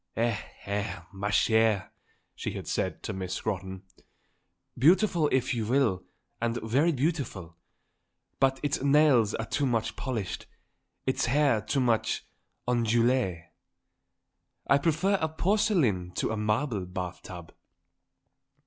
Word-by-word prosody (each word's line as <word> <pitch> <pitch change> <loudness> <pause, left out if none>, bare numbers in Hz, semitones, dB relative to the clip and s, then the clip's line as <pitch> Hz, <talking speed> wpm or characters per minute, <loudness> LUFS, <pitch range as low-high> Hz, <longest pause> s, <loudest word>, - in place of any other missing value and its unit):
"Eh, 115 -1 +2 0.3
eh, 100 -1 -2
ma 100 +1 -3
chère," 110 -2 +2 0.4
she - - -5
had - - -7
said - - -2
to - - -3
Miss 95 -1 -4
Scrotton, 95 0 -4 0.9
"beautiful 170 - +4
if 130 0 +1
you 115 -3 -2
will, 120 -7 +2 0.4
and 120 0 0
very 135 +10 +2
beautiful; 130 - -2 0.8
but 135 0 +2
its 145 -2 0
nails 140 -6 +4
are 115 - -3
too 140 +3 0
much 115 -3 -1
polished, 115 -9 -4 0.6
its 130 - +1
hair 140 -3 +3
too 140 - -1
much 115 -3 +1 0.4
ondulé. 120 -6 +2 1.2
I 140 - +4
prefer 175 +6 +1
a 160 - +1
porcelain 160 - +1
to 90 - -1
a - - -1
marble 105 -1 -1
bath 90 -1 -5
tub." 85 -3 -10
120 Hz, 120 wpm, -28 LUFS, 100-140 Hz, 1.2 s, beautiful